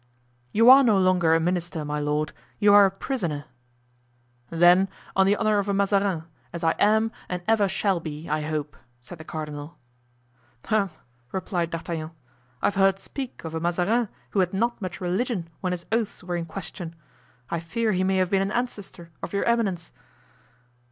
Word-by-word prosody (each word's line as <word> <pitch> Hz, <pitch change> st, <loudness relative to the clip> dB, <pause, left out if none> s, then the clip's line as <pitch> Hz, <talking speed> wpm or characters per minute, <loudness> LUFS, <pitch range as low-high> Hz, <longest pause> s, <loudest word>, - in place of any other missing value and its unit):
"You 230 Hz, +2 st, +4 dB
are 275 Hz, +1 st, +9 dB
no 220 Hz, -5 st, +4 dB
longer 180 Hz, -3 st, +4 dB
a -, -, +3 dB
minister, 170 Hz, -2 st, -2 dB
my 150 Hz, 0 st, -2 dB
lord; 150 Hz, +1 st, -1 dB, 0.2 s
you 205 Hz, -1 st, +5 dB
are 205 Hz, -1 st, +9 dB
a -, -, 0 dB
prisoner." 185 Hz, -, -3 dB, 1.0 s
"Then, 175 Hz, +3 st, +5 dB, 0.3 s
on 190 Hz, 0 st, +4 dB
the 200 Hz, -, +4 dB
honor 215 Hz, -1 st, +2 dB
of 200 Hz, 0 st, -2 dB
a 200 Hz, -, +1 dB
Mazarin, 195 Hz, -4 st, +1 dB, 0.3 s
as 170 Hz, 0 st, -6 dB
I 165 Hz, -, +4 dB
am 220 Hz, +2 st, +3 dB, 0.2 s
and 180 Hz, -1 st, -3 dB
ever 220 Hz, -2 st, +4 dB
shall 195 Hz, -1 st, 0 dB
be, 155 Hz, -1 st, -7 dB
I 155 Hz, +1 st, 0 dB
hope," 150 Hz, -1 st, -3 dB, 0.2 s
said 155 Hz, +7 st, -12 dB
the -, -, -8 dB
cardinal. 150 Hz, -1 st, -6 dB, 0.9 s
"Hem," 210 Hz, -3 st, +1 dB, 0.4 s
replied 180 Hz, -3 st, -2 dB
D'Artagnan. 165 Hz, -1 st, -4 dB, 0.5 s
"I -, -, +3 dB
have 205 Hz, -, +2 dB
heard 195 Hz, 0 st, +4 dB
speak 260 Hz, +6 st, -7 dB
of 160 Hz, -1 st, -6 dB
a 160 Hz, -, -2 dB
Mazarin 180 Hz, +7 st, +1 dB, 0.2 s
who 200 Hz, -, 0 dB
had 185 Hz, 0 st, +1 dB
not 235 Hz, +3 st, 0 dB
much 185 Hz, -2 st, -5 dB
religion 185 Hz, 0 st, -1 dB
when 185 Hz, -, -2 dB
his 175 Hz, -1 st, -4 dB
oaths 225 Hz, -4 st, -1 dB
were 180 Hz, -1 st, -3 dB
in 170 Hz, -1 st, -2 dB
question. 170 Hz, 0 st, -7 dB, 0.6 s
I 170 Hz, -, 0 dB
fear 215 Hz, +7 st, -1 dB
he 185 Hz, -2 st, +1 dB
may 190 Hz, 0 st, +2 dB
have 185 Hz, -1 st, +1 dB
been 195 Hz, -1 st, +3 dB
an 195 Hz, +1 st, -1 dB
ancestor 205 Hz, -8 st, -4 dB
of -, -, -6 dB
your 200 Hz, -, +1 dB
eminence." 200 Hz, -8 st, 0 dB
185 Hz, 180 wpm, -25 LUFS, 165-205 Hz, 1.0 s, are